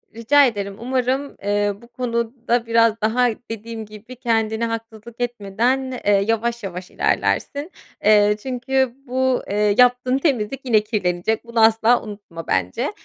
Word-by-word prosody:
Rica 275 +5 +5
ederim. 200 -3 -4
Umarım, 260 +3 -1
eee, 205 0 +1
bu 235 - -15
konuda 235 0 -2
biraz 230 -1 +3
daha 235 +4 +2 0.2
dediğim 225 0 -6
gibi 215 +4 -12
kendine 225 -1 0
haksızlık 230 0 -6
etmeden, 240 +3 -1
eee, 205 - +4 0.2
yavaş 230 +1 -1
yavaş 180 -1 -7
ilerlersin. 290 +5 -1 0.3
Eee, 210 0 +5
çünkü 260 0 0
bu, 260 0 0
eee, 205 0 +2
yaptığın 250 +1 +4
temizlik 270 -4 -1
yine 225 -4 +4
kirlenecek. 210 0 -1
Bunu 235 -1 +1
asla 225 +2 +4
unutma 200 -6 -9
bence. 90 0 -1
230 Hz, 135 wpm, -21 LUFS, 210-250 Hz, 0.3 s, Rica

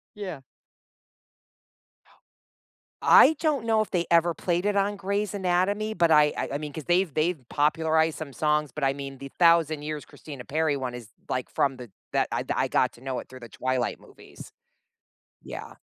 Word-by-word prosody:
Yeah. 185 -9 -7 2.6
I 320 - +8
don't 295 -8 0
know 220 -1 +3
if 215 - -2
they 175 -2 0
ever 170 0 +4
played 175 +2 -1
it 205 0 +1
on 200 +1 +1
Grey's 200 +1 -2
Anatomy, 200 +3 0
but, 170 -3 +2
I 150 -1 +5
I - - -2
I - - -1
mean, 150 -1 -6
'cause 155 0 -7
they've 175 0 +2
they've 155 +3 0
popularized 160 +1 +2
some 155 -3 -7
songs, 150 +1 0
but, 150 - -3
I 135 - +3
mean 140 -1 -7
the 140 +1 -9
Thousand 165 -3 +4
Years 150 0 -5
Christina 140 -5 -11
Perri 155 +1 0
one 130 -2 -4
is, 120 -3 -9 0.2
like, 125 -1 -3
from 135 -2 0
the 125 -3 -10 0.2
that - - +1
I - - -2
I - - 0
got - - +2
to - - -18
know 130 0 -4
it - - -8
through 130 0 -12
the 120 - -10
Twilight 130 +1 -2
movies. - - -14 0.9
Yeah, - - -8
155 Hz, 180 wpm, -26 LUFS, 140-180 Hz, 2.6 s, I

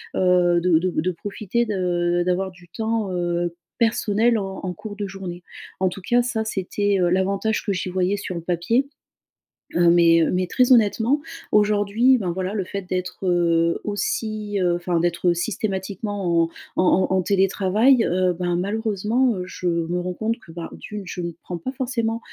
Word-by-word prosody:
heu, 180 -1 +3
de 170 -2 +4
de 185 +2 0
de 170 +3 0
profiter 205 +5 -2
de 175 -3 0
d'avoir 185 +1 0
du 180 -1 -18
temps, 220 0 -2
heu, 175 -1 -1 0.3
personnel, 225 0 +2
en 195 -1 -4
en 185 -1 -3
cours 210 +1 -8
de 205 -1 -4
journée. 185 -2 -7 0.4
En 190 0 +2
tout 190 - -8
cas 240 +6 +2
ça 235 -2 -1
c'était, 205 0 -1
heu, 175 -1 +3
l'avantage 195 +4 0
que 200 - 0
j'y 185 0 -3
voyais 185 +2 0
sur 195 -2 -5
le 170 - -4
papier. 180 +11 0 0.9
Heu, 175 0 +5
mais, 170 -1 +5
heu, - - +1
mais 180 0 0
très 250 +7 +2
honnêtement 235 +4 +4 0.3
aujourd'hui, 210 +4 +3
ben, 185 -7 -2
voilà 185 +3 -3
le 200 - 0
fait 200 +2 -5
d'être, 185 +1 -4
heu, 170 -1 +2
aussi 210 0 -2 0.2
enfin 175 0 -1
d'être 175 +1 +1
systématiquement 190 -2 -1
en - - -8 0.3
en - - +2 0.3
en - - 0
en 185 - +3
télétravail, 200 +6 +3
heu, 185 -1 +1
ben, 175 0 -1
malheureusement, 220 +5 0
heu, 180 - -3
je 180 0 -5
me 170 +1 0
rends 180 +1 -3
compte 225 +1 -1
que, 170 - -15
bah, 165 0 -7
d'une, 210 -1 -7
je 180 - -5
ne 170 -1 -4
prends 175 - -5
pas 260 - -4
forcément, 240 -3 -2
190 Hz, 180 wpm, -23 LUFS, 175-215 Hz, 0.9 s, Heu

